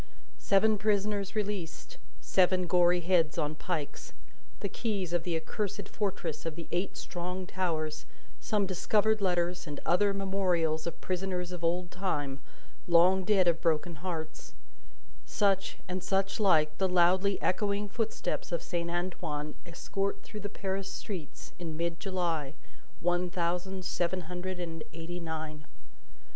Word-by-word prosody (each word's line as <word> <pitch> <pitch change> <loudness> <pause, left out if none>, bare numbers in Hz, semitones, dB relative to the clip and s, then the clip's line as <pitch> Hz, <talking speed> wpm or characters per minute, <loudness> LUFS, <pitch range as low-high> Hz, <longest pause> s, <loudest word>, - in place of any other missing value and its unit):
Seven 210 +1 +4
prisoners 205 -1 +1
released, 205 - -3 0.2
seven 185 -1 +3
gory 175 0 +4
heads 170 -3 +3
on 150 +1 0
pikes, 155 -2 -4 0.5
the - - 0
keys 195 -4 -2
of 175 - +2
the 170 -1 -1
accursed 205 +3 -3
fortress 200 -7 -2
of 165 -2 -3
the 170 0 -7
eight 180 +3 -1
strong 180 +1 -4
towers, 165 -5 -2 0.3
some 210 -2 +1
discovered 210 +3 +2
letters 180 -2 +1
and 145 -1 -5
other 200 +4 +4
memorials 185 -5 +1
of 170 - -5
prisoners 180 -1 -2
of 175 -1 -6
old 175 +1 +1
time, 145 -8 -2 0.5
long 180 +2 +6
dead 190 -2 +4
of 170 -1 +3
broken 165 0 +1
hearts, 160 -2 -5 0.7
such, 195 -2 +1
and 185 0 -3
such 195 +1 +1
like, 160 -7 +4
the 190 -1 +3
loudly 185 +2 +4
echoing 200 +2 +1
footsteps 220 -2 -2
of 170 - -1
Saint 170 -1 -2
Antoine 170 -4 -2
escort 195 +3 -2
through 215 - -8
the 205 0 -4
Paris 195 -1 -3
streets 180 -8 -6
in 165 -3 -4
mid 170 0 -1
July, 170 -7 -1 0.5
one 175 +1 +2
thousand 180 +2 -1
seven 180 +1 0
hundred 180 +2 -5
and 165 -2 -4
eighty 170 +2 -5
nine. 155 -3 -5
180 Hz, 140 wpm, -31 LUFS, 170-195 Hz, 0.7 s, long